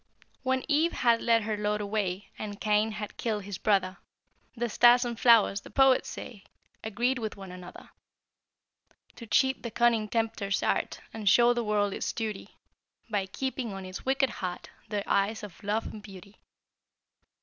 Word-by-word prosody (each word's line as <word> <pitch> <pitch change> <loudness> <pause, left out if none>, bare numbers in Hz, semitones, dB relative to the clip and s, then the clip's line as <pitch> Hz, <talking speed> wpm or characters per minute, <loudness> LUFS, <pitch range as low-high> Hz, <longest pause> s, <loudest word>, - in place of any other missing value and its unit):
When 260 0 0
Eve 315 +3 +2
had 235 -2 +2
led 230 -2 +3
her 215 0 -2
lord 210 0 -1
away, 205 -2 -2
And 205 -1 -6
Cain 215 +1 +1
had 210 0 -7
killed 215 -3 -2
his 195 -1 -6
brother, 195 -3 +1 0.6
The 240 0 -1
stars 240 +2 +5
and 235 -1 -4
flowers, 225 -4 +5
the - - -13
poets 270 -1 +4
say, 205 -5 -9 0.4
Agreed 240 +4 0
with 220 -3 -5
one 195 -2 -9
another 180 -1 -11 1.3
To 230 - -9
cheat 265 +5 +2
the 235 - -5
cunning 230 -1 +2
tempter's 220 -3 -1
art - - -1
And 215 -3 0
show 240 +4 +6
the 240 -1 -1
world 205 -2 +1
its - - -3
duty, 220 -3 -5 0.5
By 200 -2 0
keeping 260 +1 -4
on 195 -1 -7
its 185 0 -8
wicked 270 0 +1
heart 180 -1 -5 0.2
Their 205 -2 -2
eyes 200 +2 0
of 205 0 -10
love 210 +2 -1
and 215 - -8
beauty. 200 0 -13
215 Hz, 165 wpm, -28 LUFS, 200-240 Hz, 1.3 s, show